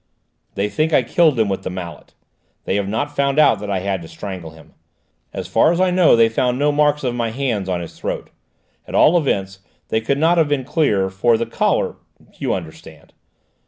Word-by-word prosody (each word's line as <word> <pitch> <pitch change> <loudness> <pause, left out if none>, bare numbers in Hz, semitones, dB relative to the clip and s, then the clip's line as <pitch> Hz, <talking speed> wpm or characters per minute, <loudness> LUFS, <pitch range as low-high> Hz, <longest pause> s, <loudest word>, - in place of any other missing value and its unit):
"They 100 +1 0
think 155 +8 -1
I 130 - +4
killed 150 +1 +2
him 110 - +3
with 95 -1 -2
the - - -5
mallet. 90 -2 -8 0.5
They - - -2
have 100 -1 -2
not 145 +8 -3
found 140 0 0
out 145 -9 +5
that 105 0 -6
I 95 -2 -1
had 95 -1 -2
to 80 - -10
strangle 95 -3 -7
him. 80 0 -17 0.6
As 95 -2 -6
far 115 - +3
as 175 - -1
I 185 -1 +3
know, 180 -6 +5
they 115 -1 +5
found 125 +2 0
no 145 +2 +2
marks 150 0 +1
of 125 -2 -1
my 120 -1 -2
hands 115 -6 -2
on 90 -1 -1
his 85 - -10
throat. - - -5 0.6
At - - -6
all 165 - +5
events, 95 - -1 0.3
they 110 - 0
could 140 +5 0
not 165 +3 +3
have 160 - +3
been 145 -3 -1
clear, 115 - +1
for 110 +5 +2
his 115 - -3
collar - - 0 0.4
you - - -1
understand." 80 -4 -8
115 Hz, 210 wpm, -19 LUFS, 95-145 Hz, 0.6 s, out